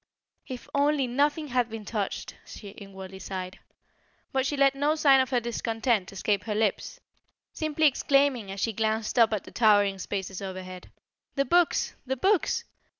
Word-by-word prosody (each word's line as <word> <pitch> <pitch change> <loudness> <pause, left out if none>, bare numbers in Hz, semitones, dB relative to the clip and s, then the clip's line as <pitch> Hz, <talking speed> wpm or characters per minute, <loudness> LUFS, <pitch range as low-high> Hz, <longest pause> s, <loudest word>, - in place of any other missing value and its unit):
"If 255 -2 -7
only 285 -1 +2
nothing 290 +4 0
had 245 -1 +1
been 220 -1 -7
touched!" 205 -2 -4
she 205 - -10
inwardly 190 -1 -10
sighed. 185 -1 -6 0.7
But 265 0 +1
she 290 - -2
let 275 0 +4
no 290 +3 +1
sign 275 -4 +5
of 260 - -1
her 250 -2 +2
discontent 225 -3 -1
escape 195 0 -1
her 215 -2 -2
lips, 220 - -1 0.5
simply 310 0 0
exclaiming 275 -5 +2
as 195 +1 -6
she 225 +3 0
glanced 220 +2 -1
up 225 -1 +6
at 215 -4 -1
the - - -13
towering 205 -4 +3
spaces 190 0 -4
overhead: 185 -1 -7 0.5
"The 275 -1 +1
books! 350 +1 +2
the 265 +1 -1
books! 385 +6 +2
230 Hz, 160 wpm, -27 LUFS, 200-275 Hz, 0.7 s, up